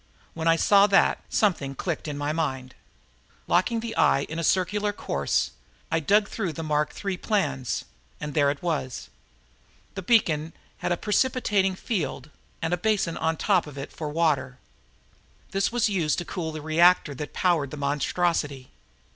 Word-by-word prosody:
When 165 0 -3
I 165 - +6
saw 200 +4 +5
that, 195 -1 +3
something 145 -10 +1
clicked 165 +1 -3
in 145 -1 -4
my 145 +1 -1
mind. 130 -5 -2 0.7
Locking 225 +6 +2
the 230 -1 -5
eye 135 - +4
in 160 +3 -5
a - - -2
circular 200 +5 +1
course, 205 - -1 0.4
I 160 - +2
dug 205 +7 +3
through 195 -7 -3
the 165 - -5
Mark 150 -1 0
III 195 -2 -1
plans 145 - -1 0.3
and 150 -1 -5
there 145 -3 +3
it 140 +3 -4
was. 150 -7 -3 0.8
The 195 - -5
beacon 165 -7 +2 0.3
had - - -2
a 175 - +1
precipitating 210 -4 +1
field 155 - -3 0.3
and 165 - 0
a - - +2
basin 195 -3 0
on 160 0 -1
top 185 -6 +2
of 145 -1 -10
it 135 - -6
for 155 -2 -5
water; 150 -5 0 0.9
this 195 +3 0
was 240 -2 +2
used 175 -7 0
to 175 - -3
cool 165 -1 -4
the 155 -1 -7
reactor 165 -1 +4
that 145 +2 -6
powered 170 -7 +1
the 150 - -8
monstrosity. 145 -1 -1
165 Hz, 165 wpm, -26 LUFS, 150-195 Hz, 0.9 s, I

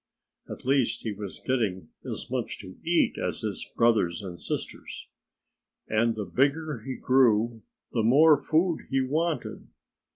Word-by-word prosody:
At - - -8
last 135 -2 +2
he 110 - -2
was 100 -1 -8
getting 105 -10 -1
as - - -5
much - - -2
to 95 - -11
eat 170 0 +2
as - - -2
his - - -4
brothers 110 -5 +2
and 90 -3 -7
sisters. - - -5 0.8
And 115 +1 +2
the 105 - -3
bigger 145 +2 0
he 130 -1 -4
grew, 115 -3 +3 0.3
the 115 - +1
more 145 +8 +6
food 165 +2 +1
he 135 -1 +2
wanted. 155 +5 -2
125 Hz, 140 wpm, -27 LUFS, 110-145 Hz, 0.8 s, more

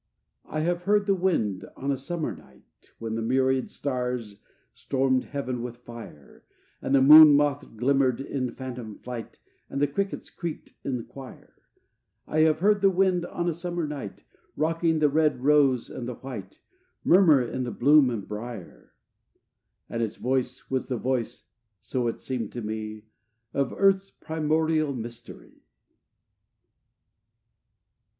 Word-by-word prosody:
IV - - -18
I 155 - -1
have 175 +2 0
heard 205 0 +3
the 200 - +3
wind 135 - 0
on 140 +2 -2
a - - +1
summer 160 +4 -4
night, 65 0 -21
When 115 -1 -5
the 115 - -2
myriad 130 +2 +1
stars 125 -6 -3 0.3
stormed 130 -1 0
heaven 130 -4 -4
with 120 0 -6
fire, 115 - -12 0.4
And 135 - +1
the 135 - +5
moon 150 +1 +10
moth 145 -5 0
glimmered 130 0 +2
in 135 -2 -3
phantom 125 -5 -7
flight, 120 -3 -8 0.3
And 140 - -3
the 145 - +4
crickets 195 +8 -3
creaked 170 -4 -6
in 125 -4 -3
choir: 135 -2 -12 0.7
I 155 - -1
have 155 0 +3
heard 205 +1 +3
the 195 - +6
wind 185 -2 +1
on 175 0 -3
a 170 - +1
summer 175 0 -3
night, 145 -9 -7 0.3
Rocking 165 +1 +1
the 155 -1 +4
red 150 -3 +1
rose 140 -4 +3
and 120 - -6
the 125 - -4
white, 110 -8 -8 0.5
Murmur 170 -6 +6
in 125 0 -3
bloom 145 +1 +5
and 110 -5 -4
brier: 105 -2 -8 0.9
And 115 - -3
its 110 -2 -2
voice 130 0 -2
was 130 -1 -1
the 125 - -2
voice, 125 -1 -2 0.3
so 125 +3 -2
it 115 - -3
seemed 125 -5 -4
to 120 - -5
me, 110 0 -5 0.5
Of 140 -2 0
Earth's 195 0 +2
primordial 155 -2 0
mystery. 115 - -9
135 Hz, 145 wpm, -26 LUFS, 120-155 Hz, 0.9 s, moon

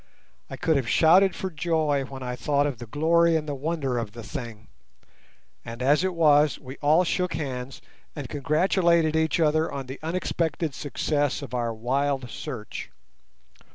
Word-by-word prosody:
I - - -7
could 160 -3 +2
have 130 -4 -2
shouted 185 +4 +5
for 190 - -4
joy 155 -3 0
when 135 -1 -8
I 125 0 -3
thought 145 +2 +1
of 140 -5 -3
the 120 - -8
glory 165 +6 +3
and 155 -1 -1
the 145 - -2
wonder 140 -3 -2
of 110 -3 -5
the 115 -1 -9
thing; 110 +1 -7 1.0
and 115 0 -8
as 145 +6 +3
it 185 -1 -1
was, 150 -2 +4
we 130 0 -10
all 155 +4 +4
shook 180 0 -1
hands 130 -3 -5 0.3
and 145 -4 -5
congratulated 165 +2 +2
each 160 +1 +1
other 155 0 +2
on 135 -1 -5
the 130 +2 -8
unexpected 165 -2 -2
success 145 +1 -1
of 130 -3 -9
our 120 -2 -1
wild 130 +2 -1
search. 125 -8 -7
145 Hz, 165 wpm, -25 LUFS, 130-160 Hz, 1.0 s, shouted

